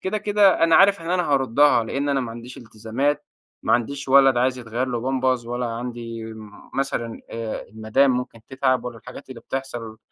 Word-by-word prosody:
كده 210 +3 -2
كده 205 -4 +4
أنا 165 - +5
عارف 200 -1 +5
إن 165 +1 -5
أنا 180 0 +2
هاردّها 135 -2 +3
لأن 140 +5 -2
أنا 140 -1 +1
ما 120 -2 -4
عنديش 120 +2 -9
التزامات، 115 +6 -3 0.4
ما - - +1
عنديش 135 +3 -1
ولد 135 -1 +6
عايز 130 +1 +1
يتغير 120 +2 -3
له 120 -1 -2
بامبرز، 130 -1 0
ولا 120 +1 -2
عندي 115 -1 -6 0.4
مثلًا 120 -4 -2
آآ، 115 -1 -4
المدام 110 +6 +2
ممكن 125 -2 -3
تتعب 130 -1 0
ولا 120 -2 -6
الحاجات 125 +3 -11
اللي 120 -3 -9
بتحصل 120 -5 -6
125 Hz, 180 wpm, -23 LUFS, 115-140 Hz, 0.4 s, ولد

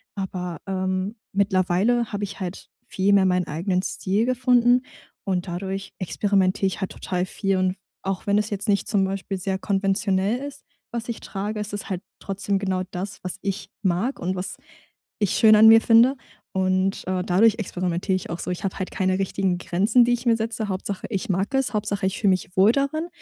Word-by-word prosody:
Aber, 180 -4 -4
ähm, 190 +2 -2 0.2
mittlerweile 200 +4 +2
habe 205 0 -2
ich 200 -1 -5
halt 185 -1 -6 0.2
viel 195 +1 +1
mehr 195 -1 +5
meinen 180 -1 +1
eigenen 180 +4 -1
Stil 200 +3 -1
gefunden 250 -1 +4 0.4
und 185 -3 -1
dadurch 190 +2 -4
experimentiere 195 +1 +1
ich 190 - -4
halt 190 - -3
total 180 -1 -2
viel. 195 +1 -1
Und 185 0 +1 0.3
auch 195 0 -3
wenn 200 0 +3
es 210 0 0
jetzt 205 +1 -3
nicht 200 -1 +2
zum 200 -2 +2
Beispiel 195 0 -3
sehr 190 0 -2
konventionell 195 +2 0
ist, 285 -1 -9 0.3
was 235 0 -4
ich 235 - -3
trage, 210 +2 -4
ist 210 0 -5
es 205 - -5
halt 185 -2 -3 0.2
trotzdem 195 0 -2
genau 190 -2 -1
das, 190 +3 -5
was 185 +1 -4
ich 195 -1 -3
mag 195 +8 0
und 185 +2 -2
was 185 +2 -5 0.6
ich 205 -4 +1
schön 215 -1 +6
an 220 +1 +8
mir 225 0 +9
finde. 235 +4 +5 0.4
Und, 185 0 0
äh, 185 -1 0
dadurch 200 +4 +4
experimentiere 185 -1 -1
ich 185 - -4
auch 170 - -3
so, - - -3
ich 180 - -5
hab 195 - -2
halt 185 - -3
keine 185 0 0
richtigen 190 -1 0
Grenzen, 205 +7 +3
die 245 - +2
ich 240 +1 -3
mir 230 - +4
setze. 220 -1 -3
Hauptsache, 190 +1 -4
ich 195 -2 -3
mag 195 +8 0
es. 270 -2 +1
Hauptsache, 205 -2 -1
ich 190 - -1
fühle 200 - +3
mich 185 0 -2
wohl 195 +4 +7
darin 285 +5 -1
195 Hz, 195 wpm, -24 LUFS, 185-215 Hz, 0.6 s, mir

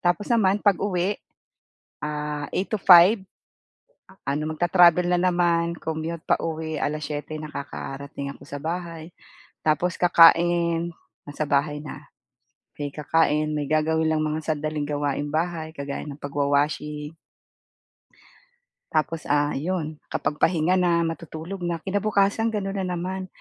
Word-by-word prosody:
Tapos 175 +4 0
naman 205 -3 +3
'pag-uwi, 195 -1 +1 0.8
ah, 150 -1 -3
8:00 195 - -2
to 215 - 0
5:00, 185 +4 +8 1.0
ano 140 +2 -1
magtra-travel 175 +1 +5
na 180 - +3
naman, 175 -2 +2
commute 160 0 -4
pauwi, 160 -1 -1
7:00 150 0 -3
nakakarating 140 -1 -6
ako - - -14
sa 145 0 -7
bahay, 165 0 -5 0.6
tapos 160 +3 +1
kakain 170 0 +5 0.3
nasa 145 +1 -3
bahay 145 +1 +1
na. 150 0 -8 0.8
Eh, 145 -1 -4
kakain 150 0 +1
may 150 - -1
gagawin 160 +1 +1
lang 155 - +1
mga 155 +1 -1
sandaling 155 0 -3
gawaing 145 0 -2
bahay 160 0 -2
kagaya 140 -2 -5
ng 145 0 -9
pagwa-washing. 150 +2 -1 1.8
Tapos, 155 0 -1
ah, 145 0 +2
'yon, 155 0 -3
kapag 150 - -2
pahinga 180 +1 +2
na 170 -2 +3
matutulog 165 +2 -5
na, 170 -2 -3
kinabukasan 205 +2 +1
gano'n 195 -1 -2
na 180 -1 -2
naman. 185 +2 -4
160 Hz, 120 wpm, -24 LUFS, 150-175 Hz, 1.8 s, 5:00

